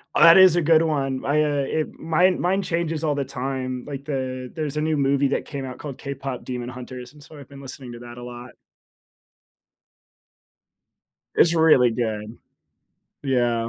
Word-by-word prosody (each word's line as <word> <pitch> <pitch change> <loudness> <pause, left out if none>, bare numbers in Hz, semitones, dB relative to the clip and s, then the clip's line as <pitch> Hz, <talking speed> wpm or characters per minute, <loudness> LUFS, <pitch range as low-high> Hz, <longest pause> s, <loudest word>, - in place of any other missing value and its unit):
Oh, - - +5
that 170 +2 +9
is 185 -3 +8
a 175 - +2
good 160 0 +4
one. 135 -5 -1
I, 150 +2 +2
uh, - - +1 0.2
it 155 -1 -2
mine 175 +3 +2
mine 190 +3 +1
changes 165 -3 -2
all 150 - +1
the 140 -1 -1
time. 130 -1 -4
Like, 140 -1 -7
the 130 -3 -4
there's 155 -3 -3
a 150 - +1
new 155 0 0
movie 140 0 +2
that - - -1
came 140 -3 -6
out 125 - -7
called 140 -4 -7
K-Pop 135 -2 -5
Demon 125 -1 -5
Hunters, 125 +1 -9
and 150 -1 -16
so 155 0 -14
I've 140 - -12
been 140 -1 -12
listening 130 -2 -9
to 120 - -9
that 120 0 -11
a 120 - -8
lot. 120 0 -9 2.8
It's 170 0 +4
really 155 -7 +5
good. 110 -1 -3 0.9
Yeah. 120 -4 +1
135 Hz, 180 wpm, -23 LUFS, 125-155 Hz, 2.8 s, that